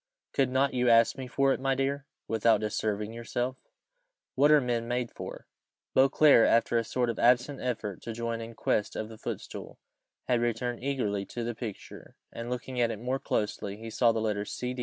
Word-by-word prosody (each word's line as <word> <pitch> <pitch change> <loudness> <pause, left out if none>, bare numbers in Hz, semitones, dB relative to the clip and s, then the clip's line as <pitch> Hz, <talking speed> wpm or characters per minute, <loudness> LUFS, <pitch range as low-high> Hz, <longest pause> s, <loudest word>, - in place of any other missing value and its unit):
"Could 135 -2 +2
not 130 +2 +2
you 125 -1 +2
ask 115 0 +5
me 130 -2 -6
for 135 +2 +2
it, - - -3
my 135 0 +1
dear, 135 +1 -1 0.2
without 110 -1 +3
disturbing 105 0 -2
yourself? 120 +2 -3 0.8
What 145 +3 +4
are 150 0 +7
men 120 -3 -1
made 120 0 -1
for?" - - -8 0.5
Beauclerc, 135 -1 +6
after 115 +1 +3
a - - -1
sort 125 +2 -1
of 115 - -8
absent 125 +3 +3
effort 110 -6 -3
to 115 - -6
join 115 0 -3
in 115 0 -8
quest 105 - 0
of 110 - -4
the 110 -1 -11
footstool, - - -6 0.5
had 120 -2 +2
returned 120 +1 -2
eagerly 120 -8 -1
to 120 - -5
the 120 +1 -2
picture, 110 -3 -8 0.2
and 115 +1 -6
looking 125 0 -3
at 120 - +3
it 110 - -3
more 125 +5 -2
closely, 105 -3 -2
he 115 +1 -8
saw 120 +1 +4
the 115 - -1
letters 105 -2 -2
C.D. 125 0 -4
120 Hz, 195 wpm, -29 LUFS, 115-130 Hz, 0.8 s, are